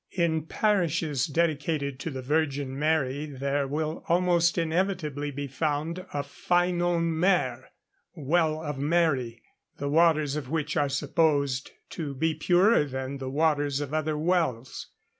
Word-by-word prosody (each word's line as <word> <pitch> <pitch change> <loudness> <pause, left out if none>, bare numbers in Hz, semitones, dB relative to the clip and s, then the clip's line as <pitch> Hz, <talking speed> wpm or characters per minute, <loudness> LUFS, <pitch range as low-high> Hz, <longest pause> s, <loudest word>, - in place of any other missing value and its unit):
In 160 -3 0
parishes 170 - +1
dedicated 150 -3 -1
to 165 - -4
the 130 -3 -6
Virgin 140 -2 -1
Mary 150 -2 0
there 140 0 -2
will 155 +3 -3
almost 175 0 +3
inevitably 165 -4 -1
be 145 0 -5
found 150 +4 -2
a 145 - -2
Ffynon 175 +3 +1
Mair, 165 -7 +1 0.5
(Well 160 +1 +1
of 145 -3 -4
Mary,) 140 -7 0 0.3
the 140 - -3
waters 155 -2 +3
of 145 -4 -5
which 155 -1 -2
are 145 -1 +2
supposed 140 -2 +1 0.2
to 145 -4 -5
be 160 +4 +1
purer 180 +6 +4
than 130 0 -5
the 130 -1 -4
waters 145 -1 +1
of 145 0 -5
other 155 -1 0
wells. 155 -7 -1
150 Hz, 135 wpm, -27 LUFS, 140-165 Hz, 0.5 s, purer